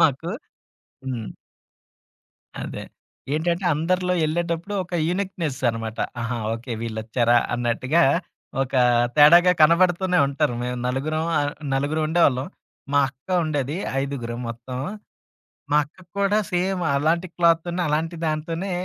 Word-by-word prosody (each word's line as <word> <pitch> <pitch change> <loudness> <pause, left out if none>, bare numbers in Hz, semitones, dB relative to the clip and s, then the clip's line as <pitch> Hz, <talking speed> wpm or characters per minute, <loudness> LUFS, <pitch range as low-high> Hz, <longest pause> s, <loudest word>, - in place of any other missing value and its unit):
మాకు. 165 +3 +2 0.7
హ్మ్. 120 -5 -4 1.4
అదే. - - -6 0.5
ఏంటంటే 170 +4 0
అందరిలో 180 +3 0
యెళ్ళేటప్పుడు 170 +4 -1
ఒక 175 - -8
యూనీక్‌నెస్‌ 175 -7 -2
అనమాట. 115 -1 -6 0.2
ఆహా! 115 +1 -2 0.2
ఓకే 120 +2 -6
వీళ్ళొచ్చార 115 +1 -1 0.2
అన్నట్టుగా 125 +7 +1 0.6
ఒక 130 - -6 0.4
తేడాగా 175 +5 +8
కనబడుతూనే 180 +2 +4
ఉంటారు. 140 -2 0
మేం 125 0 -2
నలుగురం 155 +5 -1
ఆహ్, 145 0 0 0.2
నలుగురు 145 +3 0
ఉండేవాళ్ళం. 145 -6 +3 0.5
మా 145 - +4
అక్క 130 +3 -44 0.2
ఉండేది 145 0 -2 0.3
ఐదుగురం 120 -4 -4
మొత్తం. 120 +2 -6 0.9
మా 150 - +5
అక్క 145 - -19 0.2
కూడా 200 +2 +2
సేమ్ 180 +1 0
అలాంటి 165 +5 +1
క్లాత్‌తోనే, 170 +1 +2
అలాంటి 160 +3 -1
దాంతోనే 165 +4 -2
155 Hz, 110 wpm, -23 LUFS, 130-175 Hz, 1.4 s, తేడాగా